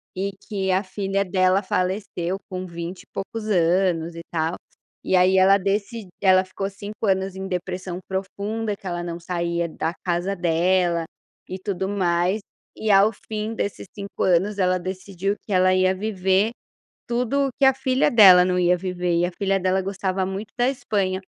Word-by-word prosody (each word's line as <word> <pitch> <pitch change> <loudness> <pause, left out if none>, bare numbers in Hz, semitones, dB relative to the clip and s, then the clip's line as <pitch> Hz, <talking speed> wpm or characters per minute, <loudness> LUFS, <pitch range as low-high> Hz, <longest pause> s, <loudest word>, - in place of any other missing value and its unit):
e 195 +2 -2 0.2
que 195 -3 -1
a 185 +2 +2
filha 195 0 -2
dela 185 +1 +2
faleceu 185 -1 -2
com 185 -1 -5
vinte 170 +1 -7
e - - -29
poucos 220 +2 -5
anos 175 -2 +2
e 170 - -6
tal. 160 0 0 0.5
E 190 - +1
aí 185 +1 +4
ela 195 +1 +6
deci 200 +2 -2
ela 185 -1 +5
ficou 195 +1 -4
5 205 +2 -6
anos 190 0 0
em 190 0 -5
depressão 180 -1 -4
profunda, 205 +3 -3
que - - -22
ela 175 -2 -3
não 170 0 -5
saía 170 -1 -2
da 160 +1 -3
casa 180 +2 0
dela 175 0 +1 0.4
e 185 - -4
tudo 190 -1 -3
mais. 180 0 +1 0.4
E, 220 -1 0
ao 200 +2 +6 0.2
fim 215 +1 -3
desses 200 -2 -4
5 200 -1 -7
anos, 190 +3 +2
ela 185 -1 +3
decidiu 185 +1 -3
que - - -8
ela 185 0 +4
ia 185 0 +3
viver 195 +1 +1 0.6
tudo 250 +4 0
o - - -5
que 280 - +4
a 265 - +7
filha 260 0 +1
dela 190 -6 +8
não 180 0 +1
ia 180 0 +3
viver, 180 -1 -2
e - - +2
a 180 - -5
filha 195 +1 0
dela 185 +1 +1
gostava 190 -1 -2
muito 195 +3 -5
da 245 +1 +3
Espanha. 195 -8 -1
190 Hz, 175 wpm, -23 LUFS, 180-200 Hz, 0.6 s, dela